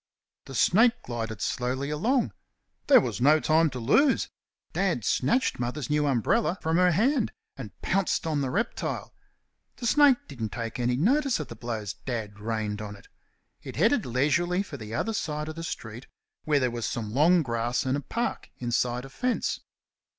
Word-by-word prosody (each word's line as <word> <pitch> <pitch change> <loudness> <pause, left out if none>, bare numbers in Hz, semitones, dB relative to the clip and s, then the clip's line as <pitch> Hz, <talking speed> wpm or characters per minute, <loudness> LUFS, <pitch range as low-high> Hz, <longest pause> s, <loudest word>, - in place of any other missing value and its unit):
The 135 - -9
snake 225 - +5
glided 115 -4 -5
slowly 130 +3 -2
along. 235 - +1 0.5
There 270 -3 +8
was 160 - -3
no 150 +4 +6
time 160 +1 +3
to 130 -2 -6
lose. 260 - +3 0.4
Dad - - 0
snatched 255 - +1
Mother's 125 +3 -3
new 150 0 +2
umbrella 140 - +1
from 160 +1 0
her 180 0 +5
hand 230 - +2 0.2
and 115 -7 -9
pounced 195 -2 +1
on 155 -3 0
the 135 - -1
reptile. 210 - -2 0.6
The 245 - -7
snake 285 +1 +6
didn't 115 -6 -5
take 115 0 -4
any 125 0 +1
notice 260 - +2
of 150 - -5
the 115 - -7
blows 110 -3 -4
Dad 110 -5 -5
rained 110 -1 -3
on 105 -1 -6
it. 100 - -18 0.5
It - - -8
headed - - +2
leisurely 160 +9 +1
for 170 - -9
the 110 -1 -7
other 225 - -1
side 150 -6 -3
of 155 - -6
the 165 - -6
street, 120 -6 -6 0.4
where 150 -2 +3
there 130 -2 +1
was 120 -1 -3
some 110 -2 -4
long 165 +5 +4
grass 120 0 -1
and 130 +1 +1
a 145 - -2
park 235 - -3
inside 120 +1 -1
a - - -10
fence. 250 - -1
140 Hz, 175 wpm, -27 LUFS, 120-180 Hz, 0.6 s, There